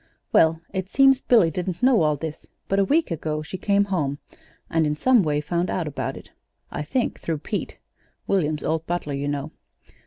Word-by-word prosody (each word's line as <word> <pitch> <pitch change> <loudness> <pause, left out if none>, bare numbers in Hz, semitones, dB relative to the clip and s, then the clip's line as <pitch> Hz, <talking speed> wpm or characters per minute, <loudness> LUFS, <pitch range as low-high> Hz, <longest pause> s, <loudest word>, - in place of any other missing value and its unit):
"Well, 160 0 +5
it 190 -1 -3
seems 270 +1 +5
Billy 215 -10 +4
didn't 180 +4 -4
know 255 -5 +5
all 150 -1 +3
this; 155 +1 -7 0.2
but 195 - +1
a - - +5
week 300 - +1
ago 155 -1 -2
she 180 +4 -7
came 200 0 +3
home, 155 -8 -1 0.5
and 160 -1 +1
in 150 - 0
some 250 +8 +4
way 150 -4 0
found 170 +4 -1
out 170 -4 -1
about 145 - -4
it, - - -13 0.4
I - - -4
think 230 - -1
through 165 -2 -2
Pete 145 - -4 0.5
William's 155 -6 0
old 160 +1 -1
butler, 175 -4 -2
you 140 +1 -2
know. 145 +1 -3
165 Hz, 190 wpm, -24 LUFS, 150-195 Hz, 0.5 s, Well